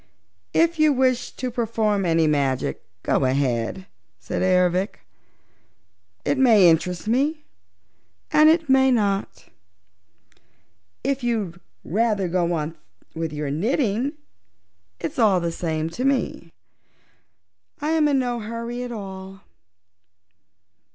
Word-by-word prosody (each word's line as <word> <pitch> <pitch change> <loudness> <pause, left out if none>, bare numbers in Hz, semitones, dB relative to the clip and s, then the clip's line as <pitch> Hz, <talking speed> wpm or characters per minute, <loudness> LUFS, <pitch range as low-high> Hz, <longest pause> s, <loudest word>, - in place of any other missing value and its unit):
"If 330 0 +3
you 310 -1 +5
wish 255 -2 +1
to 255 -1 -4
perform 220 -4 0
any 165 -1 +3
magic, 140 -4 0 0.2
go - - +1
ahead," 130 +5 0 0.3
said 90 - -4
Ervic. 180 +1 +1 1.2
"It 275 - +1
may 220 -8 +6
interest 175 +4 +1
me 290 +7 +1 0.9
and 305 +1 +6
it 325 0 +2
may 265 0 +5
not. 200 - 0 1.6
If 275 -1 -1
you'd 210 -8 -2 0.2
rather 210 -1 0
go 175 0 0
on 160 0 -3 0.4
with 165 -1 -3
your 150 -2 -3
knitting, 230 - 0 0.9
it's 165 - -5
all 205 -5 +4
the 170 -1 -2
same 160 -2 -2
to 245 - -4
me. 260 -10 -1 1.3
I 295 - -2
am 315 -2 +3
in 285 -2 +2
no 245 -2 -1
hurry 230 +2 -5
at 250 -1 -5
all." 195 -3 -8
210 Hz, 115 wpm, -23 LUFS, 170-255 Hz, 1.6 s, may